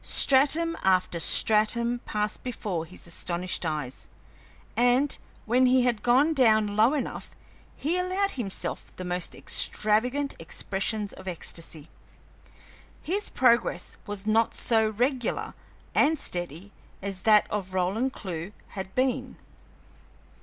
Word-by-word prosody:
Stratum 305 Hz, +5 st, +3 dB
after 185 Hz, -2 st, +2 dB
stratum 230 Hz, +7 st, +3 dB
passed 210 Hz, 0 st, -2 dB
before 200 Hz, -9 st, -4 dB
his 180 Hz, +3 st, -12 dB
astonished 175 Hz, +1 st, -2 dB
eyes, 150 Hz, -5 st, -5 dB, 0.7 s
and, 245 Hz, +4 st, +3 dB, 0.3 s
when 250 Hz, +3 st, +3 dB
he 255 Hz, 0 st, +4 dB
had 240 Hz, -4 st, 0 dB
gone 260 Hz, +8 st, +3 dB
down 220 Hz, -6 st, +3 dB
low 225 Hz, +7 st, +4 dB
enough, 285 Hz, -, -5 dB, 0.4 s
he 335 Hz, +5 st, 0 dB
allowed 375 Hz, +2 st, 0 dB
himself 215 Hz, -7 st, -4 dB
the 185 Hz, -, -6 dB
most 180 Hz, 0 st, -3 dB
extravagant 250 Hz, +7 st, +1 dB
expressions 200 Hz, +5 st, -2 dB
of 190 Hz, -, -12 dB
ecstasy. 165 Hz, -3 st, -5 dB, 1.2 s
His 395 Hz, +6 st, -1 dB
progress 235 Hz, -8 st, +1 dB
was 205 Hz, -1 st, -3 dB
not 220 Hz, +1 st, +2 dB
so 220 Hz, -2 st, +3 dB
regular 245 Hz, +3 st, -1 dB, 0.4 s
and 310 Hz, +2 st, +3 dB
steady 175 Hz, -, -4 dB, 0.3 s
as 195 Hz, -2 st, -4 dB
that 215 Hz, 0 st, +5 dB
of 190 Hz, -3 st, -3 dB
Roland 200 Hz, +8 st, 0 dB
Clewe 185 Hz, -4 st, -6 dB, 0.2 s
had 190 Hz, -1 st, -7 dB
been. 255 Hz, 0 st, -1 dB
215 Hz, 120 wpm, -27 LUFS, 185-255 Hz, 1.2 s, that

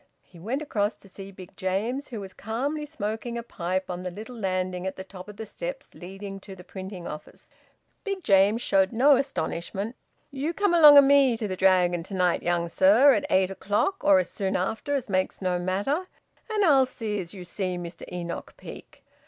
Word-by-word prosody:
He 170 Hz, -, -17 dB
went 245 Hz, -, -3 dB
across 210 Hz, -7 st, -1 dB
to -, -, -18 dB
see 195 Hz, +1 st, -10 dB
Big 185 Hz, -2 st, -13 dB
James, 220 Hz, +9 st, -2 dB
who 230 Hz, -4 st, -6 dB
was 195 Hz, -1 st, -8 dB
calmly 280 Hz, +8 st, -3 dB
smoking 235 Hz, -3 st, -4 dB
a 235 Hz, -, -4 dB
pipe 185 Hz, -4 st, -3 dB
on 180 Hz, 0 st, -5 dB
the 180 Hz, -, -4 dB
little 215 Hz, +7 st, -9 dB
landing 185 Hz, -3 st, -2 dB
at 190 Hz, -, -4 dB
the 190 Hz, -, -7 dB
top 190 Hz, 0 st, -11 dB
of 205 Hz, -, -11 dB
the 220 Hz, -, -6 dB
steps -, -, -7 dB
leading 195 Hz, +2 st, -8 dB
to 195 Hz, 0 st, -11 dB
the 180 Hz, -, -13 dB
printing 190 Hz, -1 st, -8 dB
office. 150 Hz, -, -10 dB, 0.5 s
Big 395 Hz, -3 st, -4 dB
James 200 Hz, +2 st, +4 dB
showed 190 Hz, -1 st, +2 dB
no 270 Hz, +5 st, +5 dB
astonishment. 215 Hz, -, -3 dB, 0.4 s
"You 290 Hz, +5 st, -3 dB
come 405 Hz, -1 st, +2 dB
along 300 Hz, -4 st, +9 dB
o' -, -, +12 dB
me 275 Hz, -3 st, +4 dB
to 220 Hz, -2 st, -3 dB
the 185 Hz, -, -3 dB
Dragon 180 Hz, -2 st, +3 dB
to 195 Hz, +4 st, -8 dB
night, 180 Hz, -2 st, +2 dB
young 175 Hz, 0 st, 0 dB
sir, 210 Hz, +11 st, +5 dB
at 290 Hz, -, -1 dB
eight 190 Hz, 0 st, +2 dB
o'clock, 205 Hz, -, -1 dB
or 295 Hz, -1 st, +6 dB
as 275 Hz, -, +1 dB
soon 195 Hz, -1 st, -2 dB
after 225 Hz, +9 st, -1 dB
as 270 Hz, -, -2 dB
makes 185 Hz, -2 st, -1 dB
no 180 Hz, -2 st, -1 dB
matter, 205 Hz, -, -1 dB, 0.4 s
and 425 Hz, -2 st, +1 dB
I'll 270 Hz, -5 st, +5 dB
see 215 Hz, -5 st, -4 dB
as 170 Hz, +2 st, -9 dB
you 185 Hz, -, -8 dB
see 185 Hz, 0 st, -3 dB
Mr 170 Hz, -1 st, -8 dB
Enoch 175 Hz, -1 st, -6 dB
Peake. -, -, -12 dB
200 Hz, 200 wpm, -26 LUFS, 185-265 Hz, 0.5 s, o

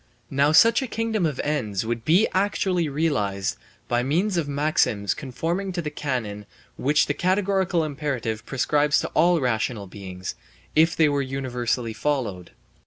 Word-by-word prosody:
Now 140 Hz, +2 st, +3 dB
such 230 Hz, -, +6 dB
a 265 Hz, -, -3 dB
kingdom 220 Hz, -5 st, 0 dB
of 145 Hz, -4 st, -4 dB
ends 110 Hz, -10 st, -1 dB
would 115 Hz, 0 st, -3 dB
be 180 Hz, -, +4 dB
actually 185 Hz, -4 st, +1 dB
realized 120 Hz, -11 st, -1 dB, 0.3 s
by 120 Hz, 0 st, +1 dB
means 175 Hz, +10 st, 0 dB
of 165 Hz, -4 st, 0 dB
maxims 140 Hz, -8 st, +1 dB
conforming 165 Hz, +8 st, -3 dB
to 175 Hz, -, -2 dB
the 150 Hz, -, -4 dB
canon 115 Hz, -9 st, -4 dB, 0.3 s
which 145 Hz, +2 st, +2 dB
the 145 Hz, -, -1 dB
categorical 185 Hz, -1 st, +1 dB
imperative 135 Hz, -7 st, -3 dB
prescribes 145 Hz, +4 st, +2 dB
to -, -, -4 dB
all 170 Hz, +2 st, +3 dB
rational 115 Hz, -4 st, -1 dB
beings, 95 Hz, -1 st, -7 dB, 0.4 s
if 160 Hz, +1 st, +4 dB
they 160 Hz, -, +4 dB
were 145 Hz, -1 st, +1 dB
universally 125 Hz, -3 st, -2 dB
followed. 110 Hz, -9 st, -2 dB
145 Hz, 150 wpm, -24 LUFS, 120-170 Hz, 0.4 s, such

